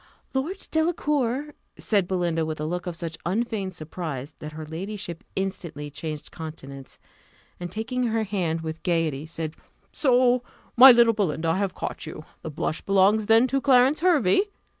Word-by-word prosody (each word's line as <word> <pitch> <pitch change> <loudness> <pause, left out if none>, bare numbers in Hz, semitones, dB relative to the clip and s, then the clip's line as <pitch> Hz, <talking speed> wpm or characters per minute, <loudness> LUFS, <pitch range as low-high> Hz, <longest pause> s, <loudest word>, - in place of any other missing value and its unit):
"Lord 315 +9 -3
Delacour!" 295 -4 0 0.2
said 200 -5 +1
Belinda, 175 -3 0
with 155 -1 -4
a 150 - -2
look 175 +3 -3
of 175 - -3
such 165 -1 -6
unfeigned 200 -1 -2
surprise, 155 -4 -6
that 150 0 -7
her 155 0 -7
ladyship 175 +2 -6
instantly 170 -6 -4
changed 155 0 -6
countenance, 140 -4 -9 0.6
and, 175 -1 -5
taking 245 +5 -2
her 225 0 0
hand 180 -6 -1
with 160 0 -5
gaiety, 160 -4 0
said, 160 -1 -5 0.4
"So, 250 -2 +3 0.3
my 260 +2 +11
little 235 -1 +6
Belinda, 165 -6 0
I 165 - +2
have 195 -2 -1
caught - - -5
you 155 0 -8 0.2
the - - -5
blush 155 +1 -3
belongs 200 +2 +3
then 225 +2 +6
to 275 +1 +1
Clarence 265 +2 +5
Hervey? 330 - +3
185 Hz, 160 wpm, -25 LUFS, 160-240 Hz, 0.6 s, my